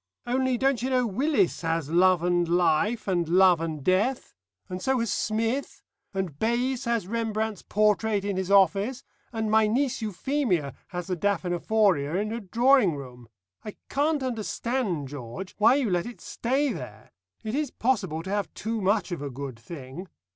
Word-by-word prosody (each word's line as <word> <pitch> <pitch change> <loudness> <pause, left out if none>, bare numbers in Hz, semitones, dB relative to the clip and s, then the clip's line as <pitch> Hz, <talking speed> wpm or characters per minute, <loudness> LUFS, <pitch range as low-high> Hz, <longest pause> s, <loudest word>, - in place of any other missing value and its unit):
Only, 255 +1 +1
don't 265 -1 +1
you 255 - -1
know 255 -1 +2
Willis 230 - +1
has 165 -3 -1
Love 180 0 +4
and 175 -1 +2
Life 180 +6 +2
and 175 -4 0
Love 180 -1 +5
and 155 -4 -4
Death? 205 - +1 0.3
And 180 0 -6
so 265 +3 +1
has 230 -2 0
Smith, 225 +5 -2 0.3
and 190 -7 -4
Bays 240 +3 0
has 235 -4 0
Rembrandt's 220 -1 -2
portrait 210 0 +1
in 200 -1 -1
his 190 0 -2
office, 200 +7 +3 0.3
and 220 -2 -2
my 220 0 +5
niece 255 +3 0
Euphemia 210 - -1
has 180 -2 -5
the 185 - -2
Daphnephoria 180 -3 +1
in 210 +3 -1
her 230 - -3
drawing 235 - +3
room. 125 -4 -10 0.3
I 210 - -7
can't 290 0 +1
understand, 230 - -2
George, 135 +6 -7
why 220 +5 +6
you 265 -8 0
let 175 +3 0
it 240 - -9
stay 265 +2 -1
there. 110 - -9 0.3
It 220 - -4
is 295 0 0
possible 195 -12 -1
to 190 - -7
have 205 -1 -1
too 220 +1 -3
much 195 0 +1
of 175 - -4
a 145 - -4
good 135 -2 -7
thing. 140 +6 -9
205 Hz, 170 wpm, -26 LUFS, 175-235 Hz, 0.3 s, why